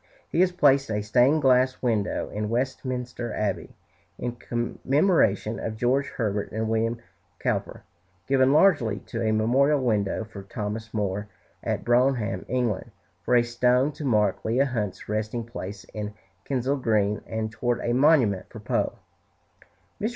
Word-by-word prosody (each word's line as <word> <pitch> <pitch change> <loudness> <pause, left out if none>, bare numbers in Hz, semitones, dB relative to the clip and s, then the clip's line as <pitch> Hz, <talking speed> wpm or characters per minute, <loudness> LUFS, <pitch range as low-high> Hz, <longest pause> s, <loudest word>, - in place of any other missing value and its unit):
He - - 0
has 185 0 +4
placed 140 -7 +3
a 105 -1 -1
stained 125 +8 +3
glass 130 0 +4
window 110 -5 -1
in 105 0 -3
Westminster 125 -1 -3
Abbey, 105 -3 -2 0.4
in 120 -1 -4
commemoration 120 - +1
of 110 -1 -4
George 130 +5 +1
Herbert 105 -3 -2
and 110 +1 -2
William 115 +1 0 0.4
Cowper; - - -2 0.4
given 130 -1 +4
largely 140 - +4
to 115 - -5
a 110 -1 +1
memorial 130 +7 +3
window 110 -5 0
for 105 -2 -10
Thomas 105 +3 -5
Moore 105 -1 -2 0.4
at - - -2
Bronham, 120 -5 +2
England; 120 -6 -1 0.3
for 125 +8 +1
a 120 - +5
stone 125 +4 +2
to 150 - -9
mark 105 -7 +1
Leigh 125 +5 +2
Hunt's 110 -8 -3
resting 110 +2 -2
place 100 -4 -7
in 105 -1 -5 0.3
Kensal 135 +1 0
Green; 105 -4 +1
and 110 -1 -3
toward 120 +1 -1
a 120 - 0
monument 125 - +3
for - - -10
Poe. - - -1 1.1
Mr. 215 - +1
120 Hz, 145 wpm, -26 LUFS, 105-130 Hz, 1.1 s, a